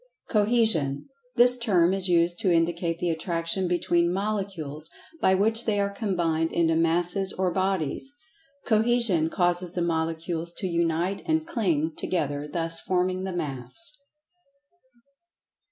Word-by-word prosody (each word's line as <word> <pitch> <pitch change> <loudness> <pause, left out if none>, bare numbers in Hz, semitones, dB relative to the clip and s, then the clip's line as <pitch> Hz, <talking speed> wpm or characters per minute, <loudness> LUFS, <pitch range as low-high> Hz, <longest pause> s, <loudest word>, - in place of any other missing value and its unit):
Cohesion: 210 - +1 0.3
This 245 +1 +8
term 185 -6 +2
is 195 -1 +1
used 170 0 +2
to 195 -5 +1
indicate 170 0 0
the 175 0 -1
attraction 165 +2 -2
between 175 -1 +1
Molecules, 190 -7 -4 0.3
by 190 - +4
which 220 +4 +2
they 210 -2 0
are 200 0 0
combined 170 -6 -1
into 165 -1 +1
Masses 175 +4 +1
or 185 -1 -1
Bodies. 190 - -2 0.5
Cohesion 220 -7 +2
causes 175 0 -1
the 175 - -1
Molecules 165 0 -2
to 190 - -6
unite 170 +2 -1
and 320 -1 +1
cling 175 - -1
together, 145 -4 -2
thus 165 +1 -4
forming 185 0 -1
the 190 - -4
Mass. 150 - -3
175 Hz, 125 wpm, -26 LUFS, 165-200 Hz, 0.5 s, This